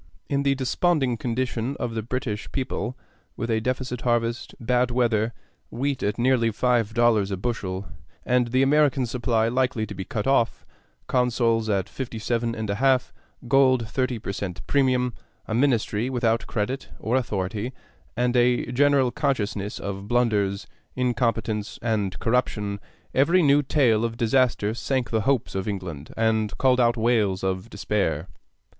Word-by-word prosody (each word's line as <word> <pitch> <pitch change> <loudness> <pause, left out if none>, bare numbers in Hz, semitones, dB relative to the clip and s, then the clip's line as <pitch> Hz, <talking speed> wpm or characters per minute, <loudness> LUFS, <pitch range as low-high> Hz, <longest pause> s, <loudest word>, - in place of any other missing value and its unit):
In 140 0 +1
the 140 -1 +2
desponding 135 0 +1
condition 125 +2 -2
of 120 -1 -2
the 110 - -2
British 115 -2 -4
people, 130 -1 -3 0.4
with 120 -2 -2
a 110 0 +1
deficient 125 0 -2
harvest, 120 -1 -1
bad 125 +1 +1
weather, 120 -2 +1 0.4
wheat 135 +2 -2
at 105 0 -1
nearly 120 -1 +3
five 115 -1 +1
dollars 115 -4 +3
a 95 - -2
bushel, 95 -2 -3 0.4
and 125 -1 +2
the 130 +3 +2
American 140 -2 +3
supply 115 -2 0
likely 125 -2 0
to 105 - -8
be 95 - -5
cut 110 -1 -4
off; 125 -4 +1 0.4
consols 115 -3 +1
at 95 -3 +1
57 115 -1 -3
1/2, 115 +4 +1 0.4
gold 130 -1 +4
at 110 - -9
thirty 130 -2 0
per 100 - -5
cent 95 -2 -5
premium; 130 -3 +2 0.3
a - - -3
Ministry 120 -2 +1
without 115 -3 0
credit 125 +5 -3
or 115 +3 -1
authority, 105 -1 -2 0.5
and 125 +1 +1
a 125 0 +2
general 135 -1 +3
consciousness 105 -9 -1
of 100 0 -5
blunders, 105 -4 +1 0.3
incompetence, 115 -4 -1
and 105 -5 -1
corruption, 105 -4 0 0.3
every 170 +7 +4
new 145 0 +5
tale 125 -6 +2
of 115 -1 -2
disaster 115 -3 +2
sank 130 +1 -2
the 110 -1 +1
hopes 135 -4 +1
of 95 +1 -3
England 90 -8 -5
and 110 -2 +1
called 130 -1 +3
out 120 -1 +3
wails 110 -5 +1
of 95 +3 -2
despair. 100 -7 -1
120 Hz, 150 wpm, -25 LUFS, 110-130 Hz, 0.5 s, new